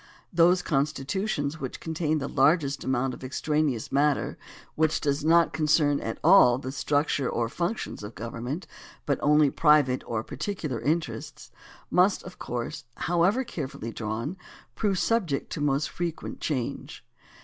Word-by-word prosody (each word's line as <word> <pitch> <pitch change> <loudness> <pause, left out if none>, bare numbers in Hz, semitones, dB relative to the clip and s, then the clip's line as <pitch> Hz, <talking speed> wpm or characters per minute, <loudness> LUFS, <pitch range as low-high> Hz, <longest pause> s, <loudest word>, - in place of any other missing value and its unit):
Those 175 +2 +4
constitutions 150 +2 -1
which 130 -3 -5
contain 160 -1 -1
the 140 -2 -3
largest 140 0 +2
amount 130 0 0
of - - -10
extraneous 140 -2 -1
matter, 145 +1 +1 0.4
which 155 0 +1
does 145 0 -1
not 165 +2 +4
concern 150 -2 +2
at 115 - -4
all 155 -8 +7
the 130 0 -5
structure 145 -1 0
or 115 - -1
functions 175 - -3
of 105 +2 -8
government, 120 - -5 0.4
but 140 - 0
only 150 -1 +4
private 150 -5 +3
or 110 -2 -2
particular 150 - -4
interests, 145 -7 -3 0.4
must, 185 +2 +3
of 180 - -11
course, 120 -1 -4
however 175 - +2
carefully 140 - -6
drawn, 115 - -4 0.4
prove 200 -3 0
subject 180 -10 0
to 150 - -4
most 145 0 +1
frequent 170 -2 -5
change. 130 -6 -4
150 Hz, 140 wpm, -27 LUFS, 130-165 Hz, 0.4 s, all